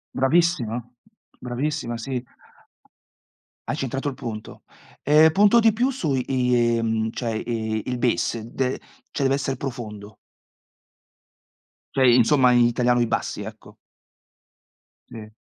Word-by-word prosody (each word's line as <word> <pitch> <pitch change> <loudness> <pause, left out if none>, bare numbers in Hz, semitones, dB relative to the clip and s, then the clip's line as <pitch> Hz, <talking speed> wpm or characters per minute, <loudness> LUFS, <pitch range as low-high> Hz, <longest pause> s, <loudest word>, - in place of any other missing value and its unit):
Bravissima, 135 -4 +1 0.6
bravissima, 125 0 -3
sì. 125 +1 -4 1.4
Hai 145 - -2
centrato 135 0 -3
il 135 - -6
punto. 110 -4 -8 0.4
Eh, 155 +2 +6
punto 205 +6 +5
di 225 0 +5
più 245 +5 0
su 175 - -2
i 125 -2 +1
mhmm, 110 0 -1
cioè, 120 -1 -4
i 110 -1 -3
il 125 -1 -3
base, 120 -2 0
d 130 -1 -1 0.3
cioè, 140 - -3
deve 135 +1 +3
essere 135 -1 -2
profondo. 110 -5 -7 1.8
Cioè 135 - +4
insomma 125 +2 +5
in 120 -1 +5
italiano 120 +1 +2
i - - +3
bassi, - - -3
ecco. - - -11 1.3
Sì. 110 -1 -10
125 Hz, 120 wpm, -23 LUFS, 115-140 Hz, 1.8 s, Eh